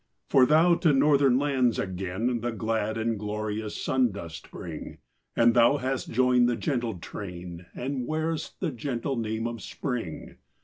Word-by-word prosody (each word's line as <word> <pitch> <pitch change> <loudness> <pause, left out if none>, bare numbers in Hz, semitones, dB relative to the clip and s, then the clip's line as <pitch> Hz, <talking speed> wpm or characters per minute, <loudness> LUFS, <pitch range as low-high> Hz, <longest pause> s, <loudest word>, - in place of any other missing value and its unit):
For 130 -1 +6
thou, 165 +3 +5
to 160 -5 +3
Northern 140 -2 +4
lands 130 -4 +2
again, 95 +6 -2
The 120 +1 -1
glad 110 0 -1
and 115 -1 -1
glorious 105 0 -3
sun 130 -3 +2
dost 85 -5 -8
bring, - - -8 0.4
And 115 0 +5
thou 120 +4 +5
hast 130 -1 -2
joined 125 0 +4
the 120 - +1
gentle 120 - -2
train 90 -1 -8
And 130 -1 -3
wear'st 160 0 -2
the 175 -5 0
gentle 130 +1 -3
name 110 -1 -2
of 115 -2 -4
Spring. 120 - -5
120 Hz, 150 wpm, -27 LUFS, 110-135 Hz, 0.4 s, For